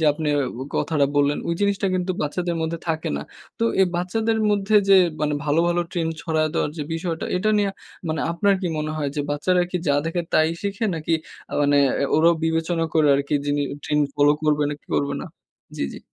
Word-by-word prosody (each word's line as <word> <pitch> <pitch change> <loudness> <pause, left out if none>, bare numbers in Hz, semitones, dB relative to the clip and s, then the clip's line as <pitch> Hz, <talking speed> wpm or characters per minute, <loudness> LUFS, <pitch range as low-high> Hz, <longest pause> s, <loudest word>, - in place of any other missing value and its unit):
যে - - +1
আপনে 150 0 -3 0.5
কথাটা 145 -4 +1
বললেন, 145 0 +3
ওই 170 - +1
জিনিসটা 200 -1 +1
কিন্তু 185 0 -1
বাচ্চাদের 170 +3 -2
মধ্যে 165 +1 -2
থাকে 160 -1 -1
না। 70 - -4 0.4
তো 230 - +1 0.2
এই 190 - +6
বাচ্চাদের 220 +6 0
মধ্যে 205 +1 +2
যে 195 - +8 0.3
মানে 150 -1 +1
ভালো, 150 +2 +2
ভালো, 175 0 +1
ট্রেন্ড 165 -3 -1
ছড়ায় 155 -1 +1
দেওয়ার 150 - 0
যে - - -1
বিষয়টা 165 0 -3
এটা 215 +4 +1
নিয়া 200 -1 +1 0.4
মানে 155 -1 -1
আপনার 200 +4 +2
কি 185 - -2
মনে 155 0 -2
হয়? 150 -2 -1
যে 145 - +1
বাচ্চারা 180 +5 +2
কি 180 - -1
যা 140 - +4
দেখে 165 +2 -1
তাই 155 0 +4
শিখে? 200 +3 -2
নাকি 160 +1 -3 0.4
আ - - -11
মানে 145 0 +3 0.4
ওরাও 165 +2 +5
বিবেচনা 165 +1 0
করে 155 -2 +4
আরকি 140 +2 -1
যিনি 145 0 +1 0.2
ট্রেন্ড 150 0 +1
ফলো 145 0 +5
করবে, 150 -1 +2
নাকি 145 - -8
করবে 140 0 0
না। - - -6 0.5
জি, - - -1
জি। - - -7
160 Hz, 200 wpm, -23 LUFS, 150-180 Hz, 0.5 s, যে